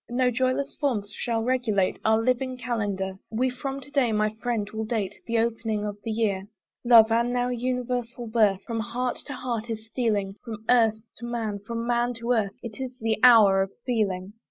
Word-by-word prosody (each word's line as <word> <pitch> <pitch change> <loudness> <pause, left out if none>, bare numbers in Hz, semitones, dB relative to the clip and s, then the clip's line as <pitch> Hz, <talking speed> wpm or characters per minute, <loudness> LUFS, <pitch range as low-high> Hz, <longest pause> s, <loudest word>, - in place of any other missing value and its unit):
No 250 +1 +2
joyless 255 +3 0
forms 215 -8 -1
shall 230 -2 -1
regulate 230 -6 +1
Our 220 +1 +3
living 255 +1 0
Calendar: 205 -6 -2
We 250 +3 0
from 270 +2 -5
to 280 +2 -14
day, 270 -5 +2
my 215 0 +1
friend, 235 -4 -1
will 220 0 -3
date 215 -3 -2
The 230 0 0
opening 225 -2 0
of 205 -1 -3
the 225 - -4
year. 205 -3 0 0.4
Love, 230 -2 +7
now 245 +2 +1
an 245 -1 -3
universal 250 -1 -2
birth. 215 -4 +2
From 230 -1 -3
heart 245 +2 -2
to 285 - -4
heart 240 -3 -4
is 220 -1 -4
stealing, 210 -4 -1
From 220 -1 -8
earth 225 -3 +4 0.2
to 235 - -7
man, 225 -4 -3
from 230 -1 -3
man 240 0 +1
to 230 +1 -3
earth, 215 -5 +1
It 235 +1 -7
is 255 -1 -5
the 220 -1 0
hour 215 -6 +7
of 195 - -1 0.2
feeling. 200 -5 -1
230 Hz, 190 wpm, -26 LUFS, 215-245 Hz, 0.4 s, Love